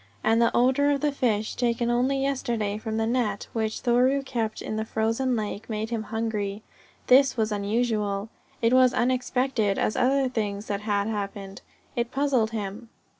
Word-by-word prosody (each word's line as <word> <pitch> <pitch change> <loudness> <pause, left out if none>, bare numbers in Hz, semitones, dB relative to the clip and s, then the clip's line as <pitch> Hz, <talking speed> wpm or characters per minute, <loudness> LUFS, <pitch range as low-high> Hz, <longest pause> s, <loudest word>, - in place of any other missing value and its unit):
And 225 +1 +3
the 235 - +5
odour 260 +4 +3
of 285 -1 +1
the 295 -1 +2
fish, 220 -6 0
taken 235 -1 0
only 255 +3 +1
yesterday 235 -6 -1
from 220 0 -3
the 225 - +1
net 225 -4 -1
which 220 -1 -2
Thoreau 255 +3 +3
kept 225 -4 -2
in 215 - -4
the 220 - -1
frozen 225 +4 0
lake, 215 0 -4
made 220 +1 -3
him 230 -2 -1
hungry. 215 -2 -2 0.4
This 270 0 +5
was 220 -1 0
unusual. 210 -1 -1 0.3
It 230 +2 +4
was 255 -1 +5
unexpected 250 -4 +1
as 215 - 0
other 265 +1 +2
things 210 -4 -3
that 200 -2 -3
had 205 -1 0
happened. 200 -2 -5 0.3
It 235 0 -1
puzzled 265 -4 +1
him. 220 +1 -5
225 Hz, 170 wpm, -26 LUFS, 210-250 Hz, 0.4 s, the